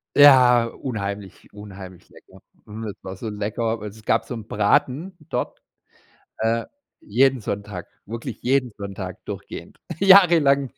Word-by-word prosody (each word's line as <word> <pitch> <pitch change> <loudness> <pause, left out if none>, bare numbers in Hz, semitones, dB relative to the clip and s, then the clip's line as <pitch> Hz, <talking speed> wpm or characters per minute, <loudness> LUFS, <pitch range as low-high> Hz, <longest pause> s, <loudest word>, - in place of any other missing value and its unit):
Ja, 125 -4 +7
unheimlich, 100 -5 -6
unheimlich 95 -3 -11
lecker. - - -18 0.3
Hm, 110 +2 -8
es 105 - -8
war 95 0 -7
so 110 +4 -6
lecker, 110 +2 -2
weil 105 0 -6
es 110 +2 -15
gab - - +1
so - - -6
'n 115 -3 -7
Braten 130 - +1
dort, - - -3 0.8
äh, 115 +1 0 0.4
jeden 130 +3 +2
Sonntag, 100 -3 -5 0.2
wirklich 115 +2 -7
jeden 130 -1 +1
Sonntag 95 -2 -7
durchgehend, - - -8 0.2
jahrelang. 170 -9 +6
110 Hz, 135 wpm, -23 LUFS, 100-130 Hz, 0.8 s, Ja